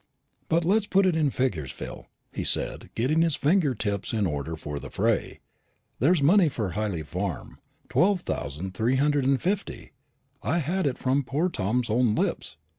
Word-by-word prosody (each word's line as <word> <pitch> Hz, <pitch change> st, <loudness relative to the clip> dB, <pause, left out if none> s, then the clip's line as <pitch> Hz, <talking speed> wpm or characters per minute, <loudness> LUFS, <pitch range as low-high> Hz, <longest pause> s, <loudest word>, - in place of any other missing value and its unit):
"Let 165 Hz, +1 st, +2 dB
us 205 Hz, +3 st, +2 dB
put 195 Hz, 0 st, +3 dB
it 180 Hz, -3 st, +3 dB
in 155 Hz, -3 st, +2 dB
figures, 100 Hz, -, -1 dB
Phil," -, -, -8 dB, 0.3 s
he -, -, -3 dB
said, -, -, -2 dB
getting 140 Hz, +8 st, +2 dB
his 165 Hz, -3 st, +2 dB
finger 150 Hz, -3 st, +2 dB
tips 100 Hz, -1 st, -3 dB
in 110 Hz, -3 st, +1 dB
order 75 Hz, -1 st, -3 dB
for 75 Hz, -2 st, -6 dB
the -, -, -8 dB
fray. -, -, -1 dB, 0.6 s
"There's 155 Hz, +5 st, +3 dB
the -, -, +3 dB
money 180 Hz, +1 st, +5 dB
for 110 Hz, -8 st, -3 dB
Hyley 100 Hz, -4 st, -2 dB
Farm 90 Hz, +2 st, -4 dB, 0.3 s
twelve 190 Hz, 0 st, +2 dB
thousand 75 Hz, -, -4 dB
three 115 Hz, +7 st, +1 dB
hundred 145 Hz, 0 st, +2 dB
and 135 Hz, 0 st, +3 dB
fifty, 195 Hz, +2 st, -3 dB, 0.5 s
I 130 Hz, -, 0 dB
had 175 Hz, +2 st, 0 dB
it 130 Hz, -, -1 dB
from 135 Hz, +2 st, +1 dB
poor 150 Hz, +8 st, 0 dB
Tom's 115 Hz, -, -1 dB
own 115 Hz, -1 st, +3 dB
lips. -, -, -2 dB
130 Hz, 180 wpm, -26 LUFS, 100-165 Hz, 0.6 s, money